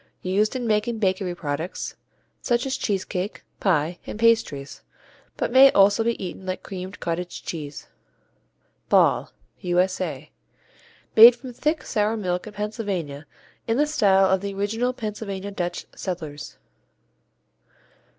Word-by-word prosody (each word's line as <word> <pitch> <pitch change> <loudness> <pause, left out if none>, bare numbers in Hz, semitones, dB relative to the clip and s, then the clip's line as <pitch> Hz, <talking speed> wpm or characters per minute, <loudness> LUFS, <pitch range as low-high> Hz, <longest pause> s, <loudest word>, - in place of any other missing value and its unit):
Used 205 +6 +1
in 250 -2 -2
making 220 +1 +1
bakery 190 -3 0
products 155 +1 -4 0.5
such 240 0 +1
as 270 - -1
cheese 195 -3 -1
cake, 185 +3 -4 0.2
pie, 170 -2 +1
and - - -5
pastries, 225 -12 +1 0.6
but - - -1
may 265 +2 +8
also 200 +3 +5
be 235 0 0
eaten 180 +1 -7
like 185 - -3
creamed 190 +1 -7
cottage 175 +1 -4
cheese. 150 -3 -6 1.0
Ball - - +3 0.3
U.S.A. 180 -5 -1 0.8
Made 230 +2 +10
from 250 +1 -10
thick 300 +5 -1
sour 215 +1 0
milk 180 -2 -2
in 210 - -9
Pennsylvania 200 -9 -4 0.4
in 225 +1 +1
the 295 - +4
style 200 -10 +4
of 190 0 +2
the 200 -1 -4
original 225 +5 0
Pennsylvania 205 -4 -5
Dutch 175 -3 -3
settlers. 155 -6 -6
195 Hz, 130 wpm, -24 LUFS, 180-225 Hz, 1.0 s, Made